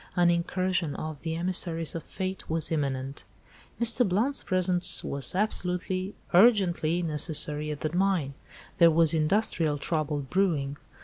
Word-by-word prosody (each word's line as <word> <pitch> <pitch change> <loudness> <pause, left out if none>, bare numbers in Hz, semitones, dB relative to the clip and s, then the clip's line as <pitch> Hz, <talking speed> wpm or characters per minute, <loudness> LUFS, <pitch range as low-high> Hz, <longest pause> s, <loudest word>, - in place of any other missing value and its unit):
An 175 -1 +4
incursion 175 -2 -1
of 155 -2 -6
the 160 -1 -3
emissaries 170 -2 -1
of 165 - -5
Fate 190 -1 -5
was 160 0 0
imminent. 135 -3 -3 0.6
"Mr. 235 +1 +4
Blount's 235 +10 0
presence 185 -1 +2
was 140 +4 0
absolutely, 185 -1 -2 0.2
urgently 180 -5 +3
necessary 150 -1 -1
at 150 -1 -6
the 155 +2 -3
mine. 180 -7 0 0.5
There 170 - +7
was 165 0 +3
industrial 160 -2 +1
trouble 150 -1 -2
brewing. 145 -2 -1
170 Hz, 130 wpm, -27 LUFS, 150-185 Hz, 0.6 s, There